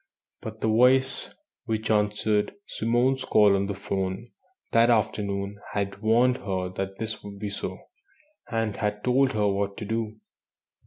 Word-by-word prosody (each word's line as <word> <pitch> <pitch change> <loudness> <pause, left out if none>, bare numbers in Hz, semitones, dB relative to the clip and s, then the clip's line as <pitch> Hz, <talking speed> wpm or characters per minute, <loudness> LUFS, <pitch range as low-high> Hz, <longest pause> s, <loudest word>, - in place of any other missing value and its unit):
But 110 0 -8
the - - +1
voice 125 +4 +4 0.3
which 110 -2 -1
answered 105 - +1
Simone's 125 - +1
call 105 -5 +5
on 100 0 0
the 100 - -3
'phone 95 +3 -3 0.4
that 115 +1 +5
afternoon 100 -3 0
had 100 0 -2
warned 120 +3 +3
her 95 -4 -3
that 95 +1 -5
this 110 0 -5
would 100 -1 -9
be 100 0 -4
so, - - -4 0.7
and 115 -3 -1
had 105 -1 -2
told 130 +1 +3
her 105 -1 +2
what 100 0 -1
to 105 - -5
do. 110 0 -2
105 Hz, 150 wpm, -26 LUFS, 100-115 Hz, 0.7 s, call